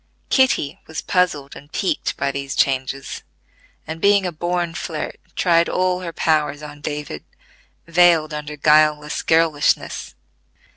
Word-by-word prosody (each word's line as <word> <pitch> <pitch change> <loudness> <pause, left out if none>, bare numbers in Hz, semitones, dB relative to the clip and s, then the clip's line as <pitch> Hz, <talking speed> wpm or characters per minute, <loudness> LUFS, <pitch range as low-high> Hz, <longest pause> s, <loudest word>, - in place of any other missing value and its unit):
Kitty 260 - +2
was 160 - -5
puzzled 155 -7 0
and 145 +2 -13
piqued 195 - -1
by 140 - 0
these 140 0 -5
changes, 135 0 -1 0.6
and 160 +1 -7
being 200 -1 +4
a 180 - -1
born 175 +1 -2
flirt 160 -2 -5 0.2
tried 170 -2 +3
all 185 0 +1
her 175 -2 -5
powers 150 -2 0
on 150 -1 -10
David, 145 - -5 0.6
veiled 170 -2 +4
under 150 0 -5
guileless 150 0 +3
girlishness. 160 -3 +1
155 Hz, 130 wpm, -21 LUFS, 145-175 Hz, 0.6 s, being